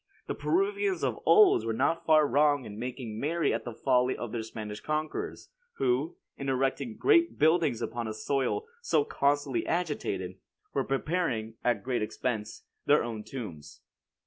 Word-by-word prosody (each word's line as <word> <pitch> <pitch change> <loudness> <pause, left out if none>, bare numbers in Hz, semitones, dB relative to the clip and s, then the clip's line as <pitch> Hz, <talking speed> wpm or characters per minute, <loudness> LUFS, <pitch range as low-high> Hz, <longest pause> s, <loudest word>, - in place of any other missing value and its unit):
The - - -3
Peruvians 395 +1 0
of - - -1
old 420 - +6
were 115 0 -1
not 165 +8 0
far 155 -1 +6
wrong 145 0 +3
in 105 0 -8
making 120 -3 -5
merry 165 +5 +1
at 115 0 -3
the 120 - -5
folly 125 0 +2
of 120 - -5
their 115 - -2
Spanish 105 -1 -6
conquerors, 155 +3 -3 0.2
who, 135 +5 0 0.2
in 140 -1 -3
erecting 135 - -1
great 340 -5 +4
buildings 155 -6 +3
upon 120 0 -3
a 110 - -3
soil 140 - -1 0.2
so 475 -2 +2
constantly 140 - +1
agitated, 170 -3 -2 0.3
were - - +1
preparing, 135 -6 -1
at 120 -5 +1
great 125 -2 -1
expense, 110 0 -3 0.2
their 145 +1 +5
own 115 -3 -5
tombs." 85 - -8
135 Hz, 155 wpm, -29 LUFS, 115-160 Hz, 0.3 s, old